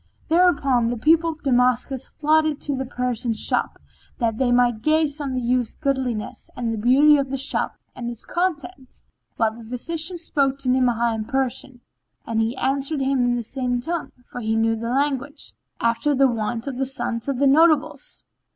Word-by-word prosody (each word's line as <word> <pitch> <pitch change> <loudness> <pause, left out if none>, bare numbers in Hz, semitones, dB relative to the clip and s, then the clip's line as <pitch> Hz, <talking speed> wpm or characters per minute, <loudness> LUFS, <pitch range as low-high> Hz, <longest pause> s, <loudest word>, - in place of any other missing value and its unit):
Thereupon 290 -9 +3
the 240 - -2
people 325 +6 +3
of 315 -1 -8
Damascus 250 0 +1
flocked 310 -1 +1
to 285 - -2
the 265 -1 -4
Persian's 245 -3 -2
shop - - -1 0.4
that 230 -3 -1
they 255 -2 +2
might 245 -2 +3
gaze 310 +1 +1
on 270 -3 -3
the - - 0
youth's 245 -1 0
goodliness 265 -6 -3
and 235 -2 -2
the - - -3
beauty 280 +6 +5
of 275 -1 -1
the 270 - -2
shop 270 - -1 0.2
and 240 -1 -5
its 235 -1 -9
contents, 345 -6 -4 0.3
whilst 225 0 0
the 225 - -12
physician 325 +8 -2
spoke 280 -5 0
to 275 -2 -2
Ni'amah 240 -2 +2
in 220 -1 -3
Persian 265 -1 -2 0.4
and 225 -1 0
he 230 +3 -1
answered 275 +3 0
him 265 -1 +1
in 245 0 +1
the 240 - -2
same 245 +1 -2
tongue, 335 +6 -4
for 245 - -8
he 220 0 0
knew 225 0 +2
the 230 +1 -4
language, 280 +2 -1 0.3
after 235 +5 +1
the 270 0 +5
wont 230 -1 -2
of 265 -3 -5
the 270 - +1
sons 240 -3 -4
of 275 -2 -1
the 280 - +2
notables. 305 0 +2
260 Hz, 185 wpm, -23 LUFS, 240-285 Hz, 0.4 s, beauty